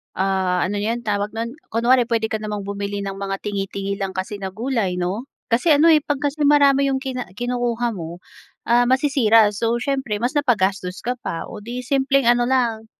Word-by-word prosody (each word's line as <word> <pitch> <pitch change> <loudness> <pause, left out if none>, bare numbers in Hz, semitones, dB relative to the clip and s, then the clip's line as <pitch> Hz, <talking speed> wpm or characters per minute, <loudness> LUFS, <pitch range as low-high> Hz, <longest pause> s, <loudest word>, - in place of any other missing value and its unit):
ah, 190 -1 0
ano 205 +2 -2
'yon 230 +3 -1
tawag 205 -1 -1
no'n? 230 +1 -3 0.2
Kunwari 240 +2 +3
puwede 225 -1 0
ka 220 - 0
namang 210 -1 -4
bumili 200 0 -3
ng 195 -1 -4
mga 195 0 -4
tingi-tingi 200 -1 -3
lang 195 -1 -3
kasi 190 +2 -4
na 190 -1 -5
gulay 225 -6 -1
'no? 195 +8 -2 0.3
Kasi 275 +7 +4
ano, 310 +3 +5
eh, 310 - +7
'pag 290 -2 -2
kasi 290 +1 -1
marami 280 -1 +5
'yong 265 -1 -1
kina 255 -2 -4
kinukuha 245 0 -1
mo, 170 0 -7 0.5
ah, 240 +1 +5
masisira. 255 -5 +4
So, 230 +2 0
siyempre 265 -7 -1
mas 245 +2 0
napagastos 195 -8 0
ka 245 +1 -1
pa. 165 - -4
Oh, - - -8
'di 245 +3 -5
simpleng 275 0 +2
ano 240 0 +3
lang, 235 -4 0
230 Hz, 190 wpm, -21 LUFS, 200-260 Hz, 0.5 s, eh